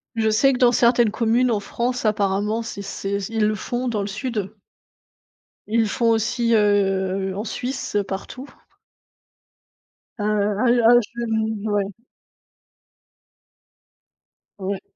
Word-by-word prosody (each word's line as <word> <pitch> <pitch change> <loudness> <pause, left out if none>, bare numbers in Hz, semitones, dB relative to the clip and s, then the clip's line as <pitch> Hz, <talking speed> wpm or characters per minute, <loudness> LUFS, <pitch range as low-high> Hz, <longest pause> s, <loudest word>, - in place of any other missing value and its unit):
je 220 -1 +1
sais 270 +6 +4
que - - -1
dans 245 -1 +5
certaines 235 -1 +3
communes 235 +3 +2
en 215 - +1
France 240 +4 -3
apparemment, 210 +1 0
c'est 225 -3 -6
c'est 195 0 -3
ils 225 -1 +1
le 215 - +1
font 245 +4 -3
dans 220 -4 -1
le 200 - -3
sud. 210 -1 -4 1.1
Ils 225 +2 +2
le - - +1
font 230 +2 +1
aussi, 230 +1 +1
heu, 195 -2 +1
en 205 - -3
Suisse 250 0 -4
partout. 250 +8 -6 1.7
A 205 - -3
heu, 210 +3 +2
à 225 - +7 0.2
je 235 0 -6
nou 220 -1 -2
ouais. 200 -1 -1 2.7
Ouais. 195 0 -3
220 Hz, 130 wpm, -22 LUFS, 205-235 Hz, 2.7 s, à